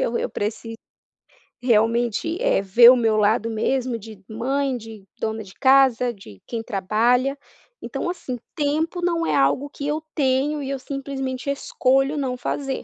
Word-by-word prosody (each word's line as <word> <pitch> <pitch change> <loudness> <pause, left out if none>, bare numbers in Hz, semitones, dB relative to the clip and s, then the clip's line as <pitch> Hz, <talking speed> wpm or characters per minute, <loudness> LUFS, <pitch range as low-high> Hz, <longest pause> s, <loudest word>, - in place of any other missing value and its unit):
eu 235 - 0
eu - - -2
preciso 225 +2 -4 0.9
realmente, 235 - +1
eh, - - +2
ver 230 +5 +7
o - - +5
meu 225 -3 +2
lado 215 +2 +2
mesmo 245 +2 -1
de 215 -1 -11
mãe, 265 +4 -1
de 220 -3 -11
dona 220 0 -3
de 195 -1 -14
casa, 260 -3 +4
de 105 - -15
quem 225 -1 -4
trabalha, 235 +7 +1 0.5
então, - - -3
assim, 255 -8 -5 0.2
tempo 315 +4 -1
não 335 -1 0
é - - +1
algo 280 +1 +2
que 280 0 -6
eu 300 +1 -1
tenho 285 +1 +1
e 270 - -5
eu 275 - -2
simplesmente 270 -1 -5
escolho 270 +1 +1
não 260 -3 -2
fazer, 270 +1 -3
255 Hz, 160 wpm, -22 LUFS, 225-275 Hz, 0.9 s, ver